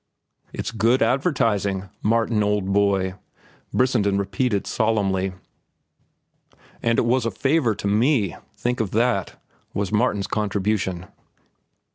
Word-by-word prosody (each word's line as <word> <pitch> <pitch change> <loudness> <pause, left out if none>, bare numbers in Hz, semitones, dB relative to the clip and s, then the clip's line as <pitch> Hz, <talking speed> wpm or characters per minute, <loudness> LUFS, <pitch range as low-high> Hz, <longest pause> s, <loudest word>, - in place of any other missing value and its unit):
"It's - - -4
good 115 +4 +2
advertising, 105 - 0
Martin, 115 0 +1
old 105 -2 0
boy," 100 -2 +2 0.6
Brissenden 110 -6 +2
repeated 100 +2 -1
solemnly. 95 -4 0 1.5
"And 115 0 +1
it - - +2
was 125 +2 +2
a - - +1
favor 135 - +1
to 100 - -4
me—think 120 - 0
of 110 -4 0
that!" 115 -5 0 0.4
was 100 -1 -1
Martin's 105 -2 +1
contribution. 100 -3 -1
105 Hz, 105 wpm, -23 LUFS, 100-120 Hz, 1.5 s, good